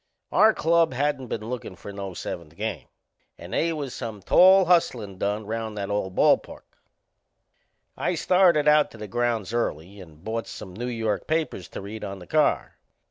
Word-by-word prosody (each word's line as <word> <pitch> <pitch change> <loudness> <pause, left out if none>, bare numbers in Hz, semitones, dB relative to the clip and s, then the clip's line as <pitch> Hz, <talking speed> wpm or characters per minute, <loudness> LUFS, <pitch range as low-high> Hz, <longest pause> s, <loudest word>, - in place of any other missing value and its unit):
Our 220 0 +5
club 165 -4 +2
hadn't 140 -1 -1
been 110 -1 -5
lookin' 120 -6 -5
for 100 +2 -10
no 100 -2 -6
seventh 80 -3 -6
game 110 +2 -4 0.5
and 85 +2 -10
they 165 - +1
was 145 -5 -4
some 105 -4 -6
tall 190 - +6
hustlin' 120 - +1
done 105 +1 -1
round 110 0 -4
that 100 0 -3
old 95 -2 -2
ball - - +5
park. - - -13 1.3
I - - -1
started 175 -5 +3
out 150 0 +5
to - - -14
the 105 0 -7
grounds 115 -1 -1
early 100 -4 -3
and 80 -2 -15
bought 115 +2 -3
some 95 - -9
New 120 +6 -5
York 110 -5 -2
papers 155 - -1
to - - -8
read 105 +3 -8
on 100 0 -5
the 90 - -11
car. - - +1
110 Hz, 180 wpm, -25 LUFS, 100-145 Hz, 1.3 s, tall